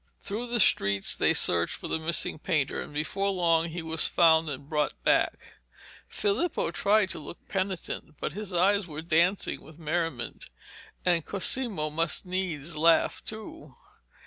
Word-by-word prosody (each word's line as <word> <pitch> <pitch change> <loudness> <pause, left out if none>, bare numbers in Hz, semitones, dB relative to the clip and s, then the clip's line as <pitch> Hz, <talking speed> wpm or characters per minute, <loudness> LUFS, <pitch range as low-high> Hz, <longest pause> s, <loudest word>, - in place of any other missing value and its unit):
Through 215 +5 -4
the 240 0 -1
streets 100 - +3
they - - +3
searched 85 -1 +2
for - - -7
the - - -2
missing 160 -1 +1
painter, 145 -3 -1
and - - -8
before 155 +7 -1
long 170 -3 +2
he 165 +1 -5
was 160 0 +1
found 160 -2 +4
and 140 0 -7
brought 150 -1 0
back. - - +1 0.5
Filippo 210 - -1
tried 200 0 +2
to 170 - -6
look 155 +3 -11
penitent, 190 -5 -4
but - - -3
his 210 -1 -5
eyes 190 +2 +2
were 155 0 -7
dancing 170 +4 +1
with 155 +1 -15
merriment, 165 -5 -3 0.6
and 175 -3 +2
Cosimo 200 -5 0
must 165 +5 0
needs 175 -4 -3
laugh 165 +2 +3
too. 220 +10 -8
170 Hz, 150 wpm, -28 LUFS, 155-195 Hz, 0.6 s, found